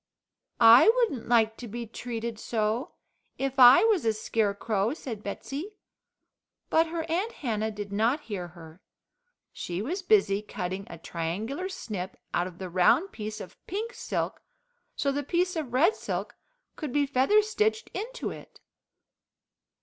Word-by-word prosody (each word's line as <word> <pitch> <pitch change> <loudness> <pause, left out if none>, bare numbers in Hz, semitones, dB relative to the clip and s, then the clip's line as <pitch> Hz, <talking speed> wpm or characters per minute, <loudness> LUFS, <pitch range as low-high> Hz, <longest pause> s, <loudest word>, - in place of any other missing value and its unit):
"I 230 - +9
wouldn't 415 - 0
like 225 -2 +3
to 245 - -8
be 235 +2 -5
treated 230 0 -5
so, 225 +6 -2 0.4
if 270 0 -2
I 250 +6 +9
was 440 -6 +3
a 225 -1 +2
Scarecrow," 215 +1 0
said 230 -9 -7
Betsey, 285 - -6 1.0
but 325 +1 +4
her 330 0 -3
Aunt 370 +8 -1
Hannah 220 -5 -2
did 205 -1 -7
not 230 +8 +1
hear 200 -9 -5
her. 165 0 -14 0.7
She 175 0 -4
was 330 - -3
busy 360 - +3
cutting 190 -1 -5
a 170 - -8
triangular 200 - -4
snip 200 - -6 0.2
out 175 - +1
of 180 -2 -11
the 185 - -5
round 185 - +3
piece 215 0 -6
of 185 - -11
pink 440 +5 -4
silk - - -3 0.5
so 280 - 0
the 285 +1 -1
piece 355 +5 0
of 305 -7 -3
red 325 - +4
silk - - -4 0.4
could 300 -5 -5
be 290 +2 +2
feather 275 +11 +3
stitched 435 +1 0
into - - -4
it. - - -12
240 Hz, 150 wpm, -28 LUFS, 210-330 Hz, 1.0 s, I